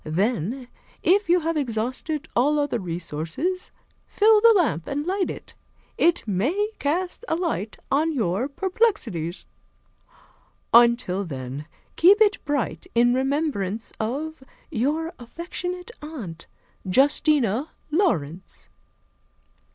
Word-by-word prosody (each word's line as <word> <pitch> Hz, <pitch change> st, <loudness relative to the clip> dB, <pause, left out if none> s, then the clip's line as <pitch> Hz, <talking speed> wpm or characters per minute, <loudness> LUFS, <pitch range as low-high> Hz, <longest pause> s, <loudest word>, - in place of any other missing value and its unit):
Then, 210 Hz, -, -1 dB, 0.4 s
if 395 Hz, +1 st, +3 dB
you 350 Hz, 0 st, +4 dB
have 330 Hz, +1 st, -1 dB
exhausted 260 Hz, +4 st, -2 dB
all 290 Hz, +5 st, +3 dB
other 290 Hz, -5 st, 0 dB
resources, 170 Hz, -, -3 dB, 0.4 s
fill 430 Hz, 0 st, +5 dB
the 465 Hz, +1 st, +8 dB
lamp 235 Hz, -, 0 dB
and 290 Hz, +2 st, -2 dB
light 375 Hz, +1 st, 0 dB
it. -, -, -8 dB, 0.4 s
It 345 Hz, -7 st, +2 dB
may 285 Hz, -, 0 dB
cast 350 Hz, +9 st, -1 dB
a -, -, +1 dB
light 325 Hz, -, -2 dB
on 305 Hz, +4 st, +2 dB
your 225 Hz, -, 0 dB
perplexities. 280 Hz, -, -1 dB, 1.3 s
"Until 235 Hz, -5 st, +5 dB
then, 135 Hz, -2 st, -6 dB, 0.3 s
keep 390 Hz, +5 st, +7 dB
it 420 Hz, -2 st, +3 dB
bright 290 Hz, -4 st, -2 dB
in 240 Hz, +1 st, +5 dB
remembrance 260 Hz, -, -1 dB
of 285 Hz, +8 st, -3 dB, 0.3 s
"Your 305 Hz, +6 st, -1 dB
affectionate 355 Hz, -, -6 dB
aunt, 225 Hz, -, -8 dB, 0.4 s
"Justina 270 Hz, -, +3 dB, 0.2 s
Laurence." 190 Hz, -, -1 dB
275 Hz, 105 wpm, -24 LUFS, 205-335 Hz, 1.3 s, the